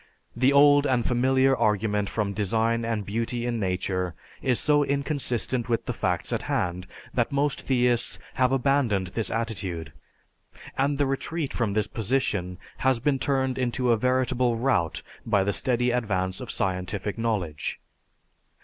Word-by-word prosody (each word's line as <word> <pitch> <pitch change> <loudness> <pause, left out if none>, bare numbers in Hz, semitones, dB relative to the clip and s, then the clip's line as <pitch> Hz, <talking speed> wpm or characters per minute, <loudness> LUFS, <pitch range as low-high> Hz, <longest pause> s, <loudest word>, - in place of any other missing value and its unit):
The 130 +3 +3
old 145 0 +6
and 125 -3 +1
familiar 130 +2 +3
argument 105 -2 +1
from 105 -3 -2
design 115 +3 0
and 115 -3 -2
beauty 115 +3 -2
in 120 -1 -1
nature 90 -2 -1 0.3
is 125 -3 +2
so 145 -1 +3
inconsistent 140 -4 -1
with 115 -1 0
the 125 - -2
facts 90 -5 -1
at - - -1
hand, 90 +1 -1 0.3
that - - 0
most 140 0 0
theists 125 -2 +1 0.2
have 130 0 +2
abandoned 125 -8 +1
this 110 +4 -2
attitude, 95 -8 -3 0.8
and 140 +1 +1
the 145 - +2
retreat 140 +3 -2
from 110 -5 -1
this 105 0 +1
position 105 -6 -1 0.2
has 130 -1 +2
been 135 +2 +1
turned 130 -2 0
into 125 0 +1
a - - +5
veritable 125 0 +1
rout 115 -9 0 0.2
by 105 -4 +2
the 100 +1 0
steady 125 +4 +1
advance 95 -6 -1
of - - -7
scientific 95 +3 -2
knowledge. 95 -11 -2
120 Hz, 150 wpm, -26 LUFS, 100-130 Hz, 0.8 s, old